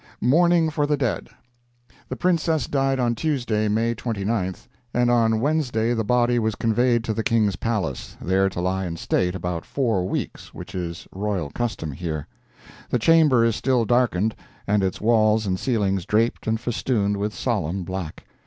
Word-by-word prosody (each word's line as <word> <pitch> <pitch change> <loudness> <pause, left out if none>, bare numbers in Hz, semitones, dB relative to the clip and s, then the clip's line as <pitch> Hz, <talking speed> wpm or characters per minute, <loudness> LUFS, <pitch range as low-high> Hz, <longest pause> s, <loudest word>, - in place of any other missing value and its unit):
MOURNING 165 +5 +3
FOR 150 -1 0
THE 150 0 +1
DEAD 130 -5 -2 0.8
The 130 - -3
Princess 165 -4 +1
died 135 -1 0
on 120 -1 +2
Tuesday, 120 -6 0
May 115 +3 +1
29th, 105 -4 -3 0.3
and 120 0 +3
on 115 -2 +3
Wednesday 125 -5 +1
the 115 -2 0
body 120 +1 +2
was 110 -2 0
conveyed 120 +1 +2
to 110 - -2
the 110 - -1
King's 110 -5 +2
palace, 95 - -3
there 95 +2 +2
to 90 - -4
lie 95 +1 -1
in 85 -1 -5
state 90 +2 0
about 90 -2 -3
four 110 -9 0
weeks, - - -5
which 90 +4 -9
is 85 -3 -5
royal 95 -6 -3
custom 110 -10 -3
here. 80 0 -4 0.6
The - - +2
chamber 145 -3 +5
is 115 -2 +1
still 125 -3 +1
darkened, 110 -4 +2 0.3
and 105 0 +2
its 95 -1 -1
walls 110 -1 +3
and 95 -2 -1
ceilings 100 -7 0
draped 110 +3 +1
and 110 0 +1
festooned 110 -4 0
with 105 +1 -1
solemn 95 -6 -1
black. 95 -3 -6
110 Hz, 165 wpm, -23 LUFS, 95-125 Hz, 0.8 s, chamber